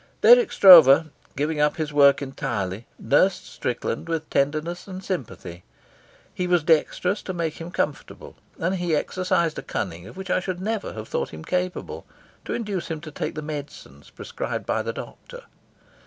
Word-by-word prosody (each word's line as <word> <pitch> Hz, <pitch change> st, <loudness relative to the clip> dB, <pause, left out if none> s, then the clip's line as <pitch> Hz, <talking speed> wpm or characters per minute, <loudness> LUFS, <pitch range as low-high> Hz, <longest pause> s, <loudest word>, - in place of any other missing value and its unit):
Dirk 485 Hz, -3 st, +6 dB
Stroeve, 160 Hz, -5 st, +8 dB, 0.2 s
giving 150 Hz, +2 st, -1 dB
up 150 Hz, 0 st, +2 dB
his 155 Hz, -2 st, -3 dB
work 140 Hz, -1 st, +5 dB
entirely, 115 Hz, -7 st, -4 dB
nursed 180 Hz, +7 st, +2 dB
Strickland 120 Hz, +4 st, -4 dB
with 160 Hz, -1 st, -2 dB
tenderness 155 Hz, +6 st, -1 dB
and 190 Hz, 0 st, -8 dB
sympathy. 110 Hz, -, -6 dB, 0.7 s
He 180 Hz, -, -2 dB
was 175 Hz, -3 st, +2 dB
dexterous 175 Hz, +4 st, +1 dB
to 185 Hz, -, -6 dB
make 165 Hz, -2 st, -3 dB
him 165 Hz, -, -6 dB
comfortable, 150 Hz, -4 st, -4 dB, 0.2 s
and 185 Hz, +3 st, -1 dB
he 175 Hz, -3 st, 0 dB
exercised 170 Hz, 0 st, -1 dB
a -, -, -5 dB
cunning 85 Hz, -2 st, -5 dB
of 150 Hz, -, -13 dB
which 190 Hz, -1 st, -6 dB
I -, -, +2 dB
should 185 Hz, -1 st, -5 dB
never 215 Hz, +2 st, -3 dB
have 110 Hz, 0 st, -8 dB
thought -, -, -2 dB
him 80 Hz, 0 st, -9 dB
capable 180 Hz, 0 st, -3 dB, 0.4 s
to -, -, -3 dB
induce 205 Hz, -6 st, -4 dB
him 160 Hz, -1 st, -4 dB
to 155 Hz, -2 st, -9 dB
take -, -, -4 dB
the 155 Hz, -, -5 dB
medicines 150 Hz, -1 st, -8 dB
prescribed -, -, -6 dB
by -, -, 0 dB
the -, -, -3 dB
doctor. -, -, -10 dB
160 Hz, 170 wpm, -24 LUFS, 140-185 Hz, 0.7 s, Stroeve